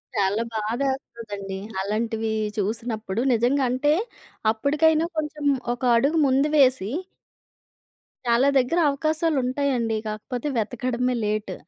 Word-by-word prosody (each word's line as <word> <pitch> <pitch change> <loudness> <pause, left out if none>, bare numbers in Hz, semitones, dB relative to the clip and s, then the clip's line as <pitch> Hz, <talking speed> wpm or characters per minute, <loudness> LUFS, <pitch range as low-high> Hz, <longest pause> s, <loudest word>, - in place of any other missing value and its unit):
చాలా 205 +2 +1
బాధేస్తదండి. 220 -4 -3 0.2
అలాంటివి 220 +2 -1 0.3
చూసినప్పుడు 220 0 -2
నిజంగా 245 +4 +2
అంటే 290 +4 +2 0.6
అప్పుడికైనా 305 +7 +2
కొంచెం 300 -1 -3 0.3
ఒక 245 - -25 0.2
అడుగు 285 +7 +2
ముందు 270 +3 +2
వేసి... 255 -7 +4 1.4
చాలా 240 +3 +3
దగ్గర 265 +7 +1
అవకాశాలు 310 +2 0
ఉంటాయండి. 250 -4 0
కాకపోతే 230 +5 -4
వెతకడమే 250 +2 -1
లేట్. 210 -2 -2
245 Hz, 100 wpm, -24 LUFS, 220-280 Hz, 1.4 s, వేసి